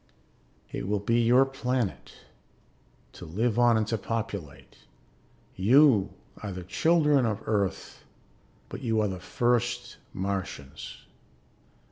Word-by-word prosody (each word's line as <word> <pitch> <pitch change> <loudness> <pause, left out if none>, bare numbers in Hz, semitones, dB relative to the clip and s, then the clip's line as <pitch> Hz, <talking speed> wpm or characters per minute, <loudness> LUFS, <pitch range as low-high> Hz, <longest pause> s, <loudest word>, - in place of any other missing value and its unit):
"It - - -4
will 105 +1 +1
be 115 +4 +1
your 125 +3 +5
planet, 125 - -3 1.0
to - - -11
live 110 +8 -1
on 120 -2 +5
and 110 - +1
to 110 0 -2
populate. 100 - -5 0.8
You 115 +1 +5 0.3
are 105 - -5
the 90 -1 -6
children 150 - +3
of 110 -1 -3
Earth 100 -4 -2 0.6
but - - -8
you 115 -3 0
are 105 - +1
the 95 -2 -5
first 120 +4 -1
Martians." 95 -8 -5
110 Hz, 115 wpm, -27 LUFS, 95-120 Hz, 1.0 s, your